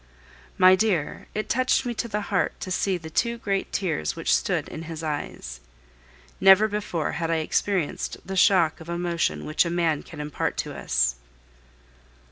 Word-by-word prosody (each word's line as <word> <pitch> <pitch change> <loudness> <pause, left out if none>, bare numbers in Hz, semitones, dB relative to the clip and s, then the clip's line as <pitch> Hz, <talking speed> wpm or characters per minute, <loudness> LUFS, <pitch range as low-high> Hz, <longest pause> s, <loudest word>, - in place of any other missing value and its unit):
My 185 0 +7
dear, 185 -7 -1
it 215 - -2
touched 255 +2 +2
me 240 - -2
to 235 - -3
the 210 -2 -2
heart 195 -2 -1
to 185 - -5
see 185 0 0
the 160 -2 -10
two 235 +7 0
great 195 -4 -2
tears 165 - -1
which - - 0
stood - - -1
in 160 - -7
his 165 -1 -6
eyes. 145 - -5 0.8
Never 195 +3 +7
before 205 -7 -2
had 165 -1 -3
I 165 - +2
experienced 165 +2 -1
the 195 - -5
shock 180 -4 +4
of 160 - -10
emotion 170 -1 -1
which 155 - +2
a 170 - -3
man 170 -3 +1
can 155 - -12
impart 150 0 -3
to - - -3
us. - - 0
175 Hz, 170 wpm, -25 LUFS, 160-200 Hz, 0.8 s, My